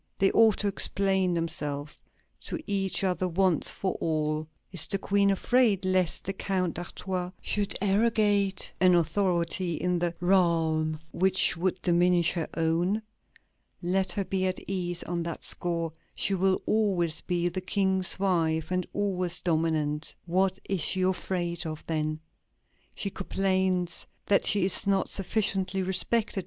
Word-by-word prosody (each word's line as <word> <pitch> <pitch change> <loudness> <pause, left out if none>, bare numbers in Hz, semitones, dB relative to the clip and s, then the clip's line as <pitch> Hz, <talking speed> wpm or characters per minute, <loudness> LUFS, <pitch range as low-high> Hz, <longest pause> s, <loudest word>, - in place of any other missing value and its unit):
They 195 - +3
ought 225 -3 +5
to 205 - 0
explain 190 -2 +2
themselves 150 -3 -3 0.4
to - - -3
each 195 -2 0
other 185 -1 0
once 180 -2 +1
for 190 - -2
all. 155 -1 -1 0.2
Is 180 - +5
the 195 - 0
Queen 200 +1 +2
afraid 205 -1 +2
lest 185 -2 +1
the 195 - -2
Count 185 -3 -1
d'Artois 180 +1 -4
should 205 -1 -2
arrogate 205 -2 +2
an 185 -1 +5
authority 170 0 0
in 180 +2 -1
the 170 0 -1
realm 165 -4 +2
which 190 0 +2
would 180 +2 -1
diminish 175 -1 +3
her 170 -3 -3
own? 170 +6 0 0.8
Let 185 +1 +1
her 200 - -2
be 190 0 0
at 185 - -2
ease 180 -2 -2
on 175 0 -3
that 170 -1 -5
score; 170 -2 -2 0.2
she 200 - 0
will 190 0 +1
always 180 -7 +1
be 175 -1 -1
the 185 +1 -3
King's 190 -1 +1
wife 165 -4 0
and 180 -1 -1
always 185 -3 -1
dominant. 155 -3 0
What 185 +2 +1
is 195 -3 -1
she 185 +5 +2
afraid 180 -2 -1
of, 155 -1 -7
then? 155 -1 -2 0.7
She 200 - -3
complains 185 -2 -1 0.2
that 200 - +3
she 200 -3 +3
is 195 - +2
not 195 -1 +1
sufficiently 195 -1 0
respected. 205 +3 0
185 Hz, 145 wpm, -28 LUFS, 170-195 Hz, 0.8 s, ought